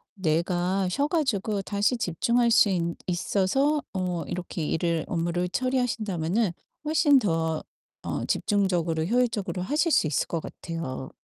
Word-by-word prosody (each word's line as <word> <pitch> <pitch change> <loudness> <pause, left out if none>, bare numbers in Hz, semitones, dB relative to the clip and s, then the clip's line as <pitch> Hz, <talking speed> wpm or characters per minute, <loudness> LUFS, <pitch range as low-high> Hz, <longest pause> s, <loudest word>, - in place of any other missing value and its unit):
뇌가 180 +2 0
쉬어 280 +10 +1
가지고 220 - 0
다시 205 +5 +1
집중할 235 +6 +1
수 225 - +6
있 180 -3 +1 0.3
있어서 210 - +1
어 180 -3 -2
이렇게 175 -2 -4
일을 165 0 0
업무를 175 +1 0
처리하신다면은 220 -7 0 0.3
훨씬 295 -2 +4
더 165 -6 0 0.4
어 - - -2
집중적으로 175 -6 +1
효율적으로 225 -4 0
하실 300 - +1
수 155 - +4
있을 145 - 0
것 165 -2 -2
같아요. 165 -6 -6
190 Hz, 300 characters per minute, -26 LUFS, 170-235 Hz, 0.4 s, 수